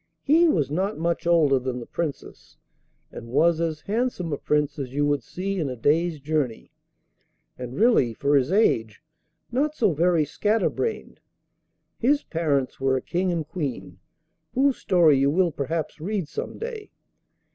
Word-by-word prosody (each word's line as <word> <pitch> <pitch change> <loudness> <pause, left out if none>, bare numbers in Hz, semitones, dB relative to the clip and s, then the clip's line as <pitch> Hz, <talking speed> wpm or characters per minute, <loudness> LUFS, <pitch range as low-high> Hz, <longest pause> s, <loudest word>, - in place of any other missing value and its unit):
He 325 +4 +5
was 145 - +1
not 190 +7 -1
much 170 +1 -1
older 155 -6 +4
than 125 -1 -4
the 120 - -8
Princess, 160 0 -6 0.5
and 115 - -9
was 165 +7 +2
as 160 -2 -2
handsome 210 -7 -2
a - - -1
Prince 150 -1 0
as 135 -1 -5
you 145 0 +2
would 145 -1 +1
see 195 +1 -4
in 150 -5 -1
a 130 - -4
day's 155 +6 +1
journey, 145 -5 -2 0.8
and 125 0 -7
really, 200 - +3
for 145 +4 +1
his 135 +3 +2
age, 115 - +1 0.5
not 290 +5 0
so 215 - +2
very 165 0 +2
scatter 210 +9 0
brained. 455 - -4 0.8
His 285 +5 +2
parents 145 -6 -1
were 135 0 +2
a - - -3
King 180 +1 -1
and 165 -3 -2
Queen, 120 - -5 0.6
whose 270 0 +3
story 165 -6 +4
you 140 +1 +3
will 175 +3 +2
perhaps 155 +2 -4
read 190 -1 -2
some - - -6
day. 455 -2 -6
160 Hz, 160 wpm, -24 LUFS, 140-190 Hz, 0.8 s, He